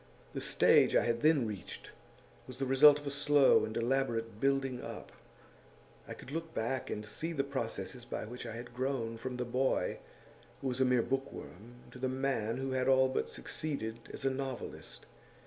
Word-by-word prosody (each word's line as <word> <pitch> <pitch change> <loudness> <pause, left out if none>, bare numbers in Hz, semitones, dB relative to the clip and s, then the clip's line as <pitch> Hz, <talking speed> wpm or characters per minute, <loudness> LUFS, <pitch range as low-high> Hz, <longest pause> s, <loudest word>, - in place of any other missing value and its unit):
The - - -3
stage - - +4
I - - +4
had 115 0 0
then 150 -5 +4
reached 105 -5 -7 0.6
was 130 -1 -9
the 135 - -1
result 140 +3 +7
of 145 - -12
a 140 - -2
slow 145 -1 +5
and 110 0 -5
elaborate 115 -3 0
building 135 -2 +1
up; - - -8 1.0
I - - -6
could 130 - -11
look 165 +1 -5
back 130 +4 -2
and 105 - -4
see 160 +11 -4
the 140 -3 0
processes 125 -4 -4
by 120 - -5
which 120 +3 -7
I 115 - -6
had 120 +1 -8
grown 125 -3 -2
from 125 +1 -4
the 125 - -2
boy 130 +2 0 0.6
who 135 - -2
was 125 +1 -2
a - - +5
mere 125 -2 +3
bookworm 120 -4 -5 0.2
to 125 - -11
the 130 0 0
man 130 -4 -1
who 135 0 -3
had 130 -1 0
all 130 0 +5
but 130 - -1
succeeded 115 -7 -4
as - - -7
a 135 - +3
novelist. 130 -1 -6
130 Hz, 185 wpm, -33 LUFS, 115-135 Hz, 1.0 s, result